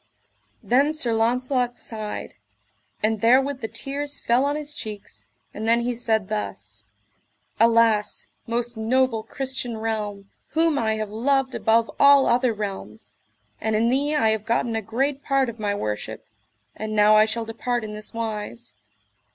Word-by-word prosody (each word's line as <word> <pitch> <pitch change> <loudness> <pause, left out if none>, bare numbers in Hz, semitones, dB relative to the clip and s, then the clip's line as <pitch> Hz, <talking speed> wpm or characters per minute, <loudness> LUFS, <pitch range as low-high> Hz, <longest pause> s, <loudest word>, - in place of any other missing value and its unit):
Then 280 +5 +3
Sir 255 -7 -1
Launcelot 245 +2 +1
sighed, 215 -2 -6 0.7
and 215 -1 +1
therewith 265 +3 +3
the 225 - -2
tears 280 +6 -4
fell 245 +3 +2
on 285 +1 0
his 300 0 -4
cheeks, 210 -7 -7 0.3
and 220 +2 -4
then 235 +1 +4
he 245 +1 -1
said 220 -4 0
thus: 105 - -5 0.7
Alas, 230 -2 +3 0.2
most 240 +1 -2
noble 235 +1 +1
Christian 255 0 -4
realm, 210 -3 -4 0.3
whom 325 -3 +3
I 220 -1 +1
have 215 -1 -4
loved 260 +4 +1
above 225 0 +2
all 280 -1 +7
other 245 0 +3
realms, 190 - -6 0.5
and 220 0 0
in 225 +2 +3
thee 285 +4 +1
I 225 -7 +3
have 220 -1 -1
gotten 230 0 0
a 220 - 0
great 265 +6 -1
part 275 -2 +2
of 235 -1 -9
my 205 -1 -1
worship, 110 - -4 0.5
and 215 0 -4
now 210 0 +6
I 215 0 +7
shall 225 +1 -3
depart 235 +1 -2
in 210 -1 -6
this 215 0 -4
wise. 225 0 -5
230 Hz, 155 wpm, -24 LUFS, 215-255 Hz, 0.7 s, all